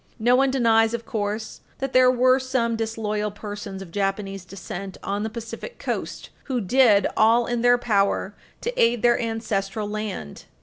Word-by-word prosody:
No 240 Hz, +2 st, +3 dB
one 270 Hz, +1 st, +3 dB
denies, 230 Hz, -3 st, +3 dB
of 230 Hz, 0 st, -7 dB
course, 215 Hz, 0 st, -4 dB, 0.2 s
that 270 Hz, 0 st, -4 dB
there 255 Hz, 0 st, +6 dB
were 255 Hz, +1 st, +4 dB
some 255 Hz, -3 st, 0 dB
disloyal 215 Hz, -2 st, -2 dB
persons 205 Hz, -2 st, -7 dB
of 175 Hz, -, -14 dB
Japanese 195 Hz, 0 st, -2 dB
descent 190 Hz, +1 st, -7 dB
on 200 Hz, +1 st, -2 dB
the 220 Hz, -, -2 dB
Pacific 230 Hz, -, -8 dB
Coast -, -, -5 dB
who 260 Hz, -3 st, -1 dB
did 220 Hz, -1 st, +4 dB
all 230 Hz, +2 st, +4 dB
in 240 Hz, 0 st, -1 dB
their 245 Hz, 0 st, +5 dB
power 200 Hz, -3 st, +1 dB, 0.3 s
to 480 Hz, +1 st, -1 dB
aid 230 Hz, 0 st, +3 dB
their 240 Hz, 0 st, +4 dB
ancestral 215 Hz, -3 st, -2 dB
land. 210 Hz, -, -5 dB
225 Hz, 165 wpm, -24 LUFS, 205-240 Hz, 0.3 s, there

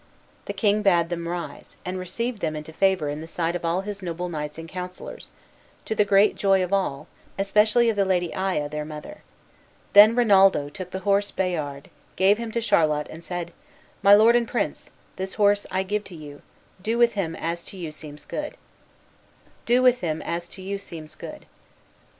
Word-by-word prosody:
The -, -, -4 dB
king 210 Hz, -1 st, +2 dB
bade 170 Hz, -5 st, +3 dB
them 170 Hz, -1 st, -3 dB
rise, 175 Hz, 0 st, -6 dB
and 185 Hz, +1 st, -3 dB
received 225 Hz, +6 st, -3 dB
them 155 Hz, -1 st, -1 dB
into 155 Hz, +1 st, -7 dB
favor 190 Hz, -3 st, +2 dB
in 145 Hz, +1 st, -4 dB
the 160 Hz, -, -8 dB
sight 170 Hz, 0 st, -2 dB
of 175 Hz, -, -4 dB
all 170 Hz, +2 st, 0 dB
his 205 Hz, 0 st, -6 dB
noble 175 Hz, 0 st, -4 dB
knights 150 Hz, -2 st, -5 dB
and 165 Hz, 0 st, -7 dB
counsellors, 180 Hz, +1 st, -8 dB, 0.6 s
to -, -, -1 dB
the 210 Hz, -, +3 dB
great 200 Hz, +1 st, +4 dB
joy 195 Hz, -2 st, +3 dB
of 180 Hz, +2 st, -3 dB
all, 185 Hz, -9 st, -1 dB, 0.3 s
especially 210 Hz, +4 st, +3 dB
of 225 Hz, -, +2 dB
the 200 Hz, -, +3 dB
Lady 180 Hz, -3 st, 0 dB
Aya, 190 Hz, -6 st, -1 dB
their 150 Hz, 0 st, -4 dB
mother. 155 Hz, -, -9 dB, 0.7 s
Then 210 Hz, +3 st, +9 dB
Rinaldo 195 Hz, -10 st, +5 dB
took 180 Hz, +4 st, -7 dB
the 190 Hz, +1 st, -5 dB
horse 200 Hz, +1 st, +2 dB
Bayard, 155 Hz, -7 st, -3 dB, 0.2 s
gave 195 Hz, +3 st, +4 dB
him 230 Hz, -1 st, -4 dB
to 235 Hz, -, 0 dB
Charlot, 155 Hz, -8 st, +2 dB
and 160 Hz, +1 st, -10 dB
said, 175 Hz, -1 st, -5 dB, 0.5 s
"My 200 Hz, +1 st, +8 dB
lord 225 Hz, +3 st, +6 dB
and 240 Hz, -1 st, +2 dB
prince, -, -, -2 dB, 0.3 s
this 190 Hz, 0 st, -4 dB
horse 205 Hz, -1 st, +3 dB
I 190 Hz, 0 st, 0 dB
give 205 Hz, +2 st, -2 dB
to 180 Hz, -, -10 dB
you; 145 Hz, -2 st, -10 dB, 0.4 s
do 225 Hz, +4 st, -1 dB
with 235 Hz, 0 st, +4 dB
him 175 Hz, -6 st, -2 dB
as 170 Hz, +1 st, -3 dB
to 195 Hz, -, -10 dB
you 165 Hz, -4 st, -5 dB
seems 150 Hz, -1 st, -9 dB
good." 300 Hz, 0 st, -5 dB
185 Hz, 170 wpm, -24 LUFS, 165-205 Hz, 0.7 s, Then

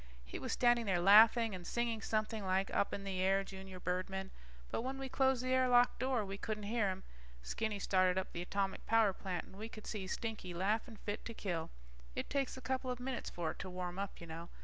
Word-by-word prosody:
He -, -, -6 dB
was -, -, -3 dB
standing 240 Hz, -2 st, +3 dB
there 185 Hz, -3 st, +2 dB
laughing 220 Hz, +4 st, +7 dB
and 180 Hz, -2 st, -6 dB
singing 235 Hz, -2 st, -1 dB
something 215 Hz, 0 st, -1 dB
like 190 Hz, +1 st, +1 dB
up 200 Hz, -, +2 dB
in 200 Hz, -, -4 dB
the 195 Hz, -2 st, -3 dB
air 195 Hz, +1 st, +3 dB
junior 190 Hz, -1 st, -9 dB
birdmen, 185 Hz, +2 st, -2 dB, 0.4 s
but -, -, 0 dB
when 260 Hz, +3 st, -3 dB
we 270 Hz, 0 st, -4 dB
closed 265 Hz, -1 st, +2 dB
the 255 Hz, 0 st, +1 dB
air 260 Hz, 0 st, +4 dB
lock 245 Hz, 0 st, +5 dB
door, 255 Hz, -4 st, +1 dB
we 195 Hz, 0 st, -6 dB
couldn't 215 Hz, -1 st, -3 dB
hear 210 Hz, -1 st, +1 dB
him. 190 Hz, 0 st, -4 dB, 0.4 s
Skinny 210 Hz, -, -2 dB
started 185 Hz, -2 st, +3 dB
up 190 Hz, -, -2 dB
the 170 Hz, -, -3 dB
atomic 195 Hz, +2 st, -1 dB
power 225 Hz, -3 st, +4 dB
plant, 180 Hz, -2 st, -4 dB
and 190 Hz, -, -14 dB
we 220 Hz, +2 st, -5 dB
could 215 Hz, -1 st, -10 dB
see 200 Hz, -4 st, -4 dB
Stinky 210 Hz, -4 st, -4 dB
laughing 215 Hz, +5 st, 0 dB
fit 205 Hz, 0 st, -3 dB
to 230 Hz, -, -6 dB
kill. 175 Hz, -7 st, -2 dB, 0.5 s
It -, -, -3 dB
takes 275 Hz, -2 st, 0 dB
a -, -, -7 dB
couple 260 Hz, 0 st, -2 dB
of 250 Hz, -1 st, -2 dB
minutes 255 Hz, 0 st, -3 dB
for 165 Hz, -2 st, -2 dB
it -, -, -12 dB
to 190 Hz, -, -5 dB
warm 180 Hz, 0 st, -4 dB
up, 200 Hz, 0 st, -4 dB
you 170 Hz, -, -8 dB
know. 165 Hz, +1 st, -7 dB
200 Hz, 230 wpm, -36 LUFS, 185-235 Hz, 0.5 s, laughing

